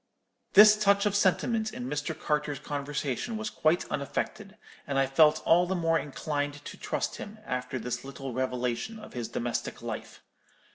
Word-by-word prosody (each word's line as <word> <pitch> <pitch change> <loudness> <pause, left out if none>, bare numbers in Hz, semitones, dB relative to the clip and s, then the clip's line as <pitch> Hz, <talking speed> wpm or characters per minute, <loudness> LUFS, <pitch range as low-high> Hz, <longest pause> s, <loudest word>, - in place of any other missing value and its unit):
"This 210 +1 +9
touch 200 -1 +3
of 205 -1 +1
sentiment 220 +3 +2
in 125 - -6
Mr. 150 +2 -3
Carter's 150 -1 -1
conversation 145 - -3
was 215 0 -4
quite 160 +3 +2
unaffected, 195 +8 -3 0.3
and 140 -1 -1
I 135 - +4
felt 150 +3 +4
all 175 +2 +5
the 190 - 0
more 165 -2 +2
inclined 145 0 -3
to - - -7
trust - - -3
him 210 +1 -8
after 125 0 -3
this 120 0 -4
little 135 -1 -7
revelation 125 - -2
of 220 - -11
his 120 -2 -3
domestic 120 +1 -3
life. - - -6
150 Hz, 160 wpm, -29 LUFS, 130-195 Hz, 0.3 s, This